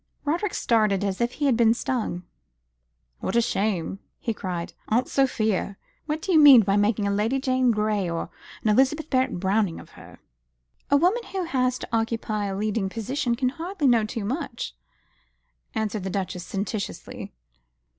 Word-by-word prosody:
Roderick 345 +7 -1
started 215 -4 +2
as 195 +1 -2
if 240 +1 0
he 295 - -2
had 265 -4 +4
been 230 0 +4
stung. 235 -9 -2 1.0
"What - - -3
a - - +6
shame!" 195 -5 -1 0.2
he 230 - -2
cried. 180 -5 -5
"Aunt 240 +4 +1
Sophia, 220 -7 0 0.3
what 310 +1 -2
do 385 - -1
you 320 - +6
mean 280 -5 +10
by 195 -1 +1
making 205 0 +2
a 200 - +1
Lady 220 +7 +1
Jane 255 -2 +2
Grey 210 -4 +1
or 170 +1 -4 0.3
an 215 - +2
Elizabeth 270 +8 +2
Barrett 260 -8 +1
Browning 190 -1 +1
of - - -14
her?" - - -14 0.7
"A 285 - +5
woman 365 +10 +2
who 385 -2 -3
has 255 -6 0
to - - -7
occupy 225 -2 -1
a 195 -1 -3
leading 210 -1 -1
position 240 +4 -2
can 255 +1 +1
hardly 335 +3 -4
know 235 -4 +5
too 215 0 -4
much," 265 0 -4 1.0
answered 215 -2 -2
the 190 - -3
Duchess 185 -2 -3
sententiously. 200 +1 -5
225 Hz, 165 wpm, -25 LUFS, 200-265 Hz, 1.0 s, mean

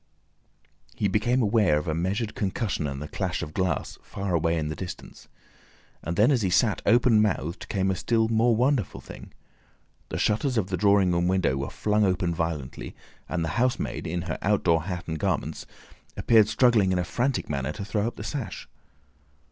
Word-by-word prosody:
He 105 - 0
became 120 +6 +1
aware 105 -8 +3
of 75 - -3
a 80 - 0
measured 100 +7 -2
concussion 100 - -2
and 70 -1 -5
the 75 - -6
clash 90 +1 -3
of 75 -2 -7
glass, 90 -4 -2
far 100 -2 -4
away 85 0 +1
in 75 -1 -2
the 75 - -4
distance. 90 -1 -9 0.7
And 85 +2 -4
then, 105 +9 +4
as 130 -4 +2
he 95 - +1
sat 100 +4 +2
open 115 0 +5
mouthed, 90 -4 -2
came 95 -1 0
a - - -1
still 110 +4 +1
more 115 +1 +3
wonderful 125 -2 0
thing. - - -11 0.8
The - - -3
shutters 125 +4 +1
of 100 -3 0
the - - +1
drawing 100 -1 +3
room 85 0 +1
window 95 -7 +1
were 70 +1 -3
flung 105 0 0
open 90 -3 +1
violently, 80 -5 -4 0.3
and 85 -1 -1
the - - -2
housemaid 125 0 -1
in 85 +1 -2
her 85 -3 -4
outdoor 85 -5 +2
hat 90 -2 -5
and 80 -1 -3
garments, - - -2 0.5
appeared 110 -3 +5
struggling 110 -5 +3
in 90 - +1
a 90 - +1
frantic 125 +8 -1
manner 70 0 -2
to 100 - -6
throw 105 +1 -1
up 120 - -5
the - - -7
sash. 130 - -5
95 Hz, 190 wpm, -26 LUFS, 85-110 Hz, 0.8 s, open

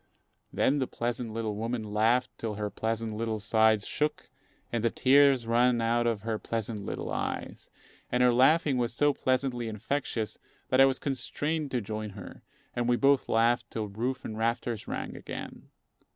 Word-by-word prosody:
Then 145 +2 +2
the 130 - 0
pleasant 120 -1 -3
little 110 -1 -2
woman 115 +2 -2
laughed 110 +4 +2
till 110 -2 -3
her 105 0 -3
pleasant 115 0 -2
little 110 0 -2
sides 110 0 +3
shook 150 +1 -2 0.4
and 115 -2 0
the 115 - +3
tears 135 0 +4
ran 120 +1 +3
out 120 +1 +1
of 110 -4 -1
her 110 -1 -2
pleasant 110 -2 -3
little - - -4
eyes; - - -4 0.4
and 125 0 +3
her 125 -1 +5
laughing 135 +2 +4
was 120 -1 -1
so 145 +3 +3
pleasantly 130 -3 0
infectious 110 0 -3 0.3
that 130 +1 +5
I - - +9
was 135 -1 +1
constrained 145 +3 -2
to 125 -2 -1
join 110 +1 -4
her, 95 - -10 0.3
and 120 0 0
we 120 - +4
both 140 +1 +3
laughed 120 +1 +2
till 110 -2 -4
roof 125 +6 -3
and 110 - -5
rafters 115 -1 -1
rang - - -4
again. - - -8
120 Hz, 170 wpm, -29 LUFS, 110-130 Hz, 0.4 s, I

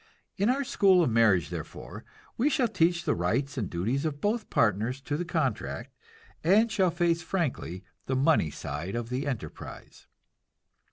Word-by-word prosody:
In 200 +4 +1
our 275 +3 +2
school 190 -7 +4
of 125 - +1
marriage 110 -7 +3
therefore - - -7 0.3
we 265 +6 +2
shall 260 -4 +2
teach 175 -4 +1
the - - +1
rights 115 +12 -1
and 110 -8 -2
duties 115 - -1
of 150 -3 -2
both 215 +4 -1
partners 115 +4 +1
to 145 +2 -3
the 175 +4 -2
contract, 155 - -2 0.5
and 210 +7 +4
shall 190 -4 +3
face 170 0 +1
frankly 150 - -3 0.2
the 130 - 0
money 135 - +3
side 75 +7 -5
of 120 -1 -3
the 130 +4 -2
enterprise. 110 - -7
145 Hz, 160 wpm, -28 LUFS, 115-180 Hz, 0.5 s, school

